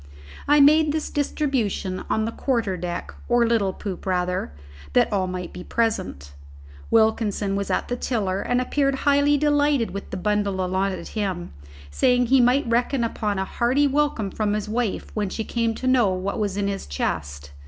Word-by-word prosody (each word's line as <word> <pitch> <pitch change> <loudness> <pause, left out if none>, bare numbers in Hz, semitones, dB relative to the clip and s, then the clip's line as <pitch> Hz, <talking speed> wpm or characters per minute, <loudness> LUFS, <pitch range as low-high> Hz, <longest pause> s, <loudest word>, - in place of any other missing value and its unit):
I 295 +1 +5
made 305 +2 +5
this 310 0 -3
distribution 255 -10 -1
on 220 - +1
the 225 - -2
quarter 230 -7 -1
deck, 175 0 -5 0.2
or 240 -1 +4
little 225 -4 +1
poop, 195 -1 -7
rather, 180 - -1 0.4
that - - +3
all 190 -2 +1
might 180 -1 -5
be 180 - -8
present: 185 - -2 0.6
Wilkinson 220 -3 +2
was 200 0 -2
at - - 0
the 245 - -2
tiller, 200 -6 -1
and 245 0 0
appeared 275 +2 +1
highly 285 0 +4
delighted 290 -4 +2
with 200 - -7
the 190 - -4
bundle 200 -1 0
allotted 190 +1 -2
him, 190 -5 -3 0.4
saying 245 - +3
that 245 - 0
he 270 -1 +6
might 250 +3 +3
reckon 240 +2 +1
upon 210 -3 -2
a 190 - -1
hearty 250 +8 +1
welcome 280 -8 0
from 210 0 -1
his 210 0 -2
wife 225 -1 -2
when 210 -2 -1
she 220 - -3
came 230 0 -1
to 255 - -6
know 255 -5 +4
what 185 +3 -2
was 205 -2 -1
in 200 -1 0
his 200 -1 -4
chest. 70 0 -3
220 Hz, 180 wpm, -23 LUFS, 190-250 Hz, 0.6 s, he